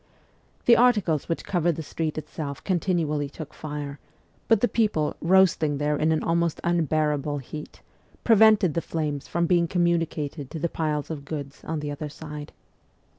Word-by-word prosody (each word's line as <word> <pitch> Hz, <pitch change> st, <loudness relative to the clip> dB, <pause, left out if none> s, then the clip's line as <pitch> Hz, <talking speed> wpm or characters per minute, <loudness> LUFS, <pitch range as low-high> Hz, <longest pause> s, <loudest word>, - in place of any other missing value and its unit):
The 235 Hz, -, +7 dB
articles 210 Hz, -, +3 dB
which 165 Hz, -, -2 dB
covered 175 Hz, -3 st, +1 dB
the 160 Hz, -, -5 dB
street 155 Hz, +1 st, -3 dB
itself 150 Hz, -2 st, -6 dB
continually 165 Hz, -6 st, 0 dB
took 155 Hz, +1 st, -9 dB
fire, 145 Hz, -2 st, -6 dB, 0.5 s
but 225 Hz, -3 st, +4 dB
the 245 Hz, -, +4 dB
people, 210 Hz, -12 st, +1 dB
roasting 170 Hz, -4 st, +4 dB
there 150 Hz, +1 st, 0 dB
in 155 Hz, +2 st, +1 dB
an 155 Hz, -, +1 dB
almost 170 Hz, -1 st, +1 dB
unbearable 155 Hz, -3 st, +1 dB
heat, 150 Hz, +3 st, -8 dB, 0.4 s
prevented 220 Hz, -6 st, +5 dB
the 170 Hz, -, 0 dB
flames 150 Hz, -4 st, -3 dB
from 170 Hz, 0 st, 0 dB
being 170 Hz, -1 st, +3 dB
communicated 165 Hz, -5 st, -1 dB
to -, -, -6 dB
the 170 Hz, +2 st, -1 dB
piles 155 Hz, -2 st, -2 dB
of 145 Hz, -3 st, -5 dB
goods 140 Hz, -2 st, -7 dB
on 160 Hz, -1 st, -3 dB
the 150 Hz, -1 st, -3 dB
other 150 Hz, +1 st, -5 dB
side. 150 Hz, 0 st, -8 dB
160 Hz, 160 wpm, -25 LUFS, 150-170 Hz, 0.5 s, The